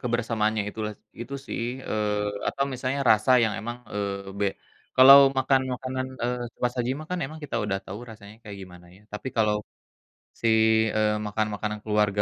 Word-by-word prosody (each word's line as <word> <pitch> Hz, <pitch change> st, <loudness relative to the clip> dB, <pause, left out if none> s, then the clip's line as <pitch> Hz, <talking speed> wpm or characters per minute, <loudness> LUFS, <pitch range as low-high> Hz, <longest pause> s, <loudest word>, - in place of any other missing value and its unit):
kebersamaannya 115 Hz, -3 st, 0 dB
itulah 105 Hz, 0 st, -4 dB, 0.3 s
itu 130 Hz, +4 st, -6 dB
sih -, -, -4 dB, 0.3 s
eee, 105 Hz, -1 st, -2 dB
apa -, -, -5 dB
misalnya 130 Hz, +2 st, -2 dB
rasa 110 Hz, +3 st, +4 dB
yang 110 Hz, -2 st, +2 dB
emang, 120 Hz, +3 st, -5 dB
eee, 100 Hz, -1 st, -4 dB
be 100 Hz, -, +1 dB, 0.5 s
kalau 135 Hz, +2 st, +10 dB, 0.2 s
makan 130 Hz, 0 st, +3 dB
makanan, 130 Hz, +1 st, -4 dB, 0.2 s
eee, 125 Hz, 0 st, -1 dB
cepat 125 Hz, -, -1 dB
saji 125 Hz, 0 st, 0 dB
mah 155 Hz, -, -8 dB
kan 180 Hz, -, -1 dB
emang 155 Hz, +3 st, -10 dB
kita 140 Hz, -, -4 dB
udah 100 Hz, -2 st, -1 dB
tahu 100 Hz, -, -6 dB
rasanya 105 Hz, -1 st, -12 dB
kayak 105 Hz, -2 st, -9 dB
gimana 90 Hz, -1 st, -13 dB
ya 100 Hz, -, -20 dB
tapi 105 Hz, +5 st, -5 dB
kalau, 105 Hz, -2 st, +3 dB, 0.9 s
si, 115 Hz, -, +1 dB, 0.5 s
eee, 105 Hz, 0 st, +2 dB
makan 105 Hz, +1 st, -1 dB
makanan 105 Hz, 0 st, -4 dB
keluarga 105 Hz, -1 st, +1 dB
110 Hz, 170 wpm, -26 LUFS, 105-125 Hz, 0.9 s, kalau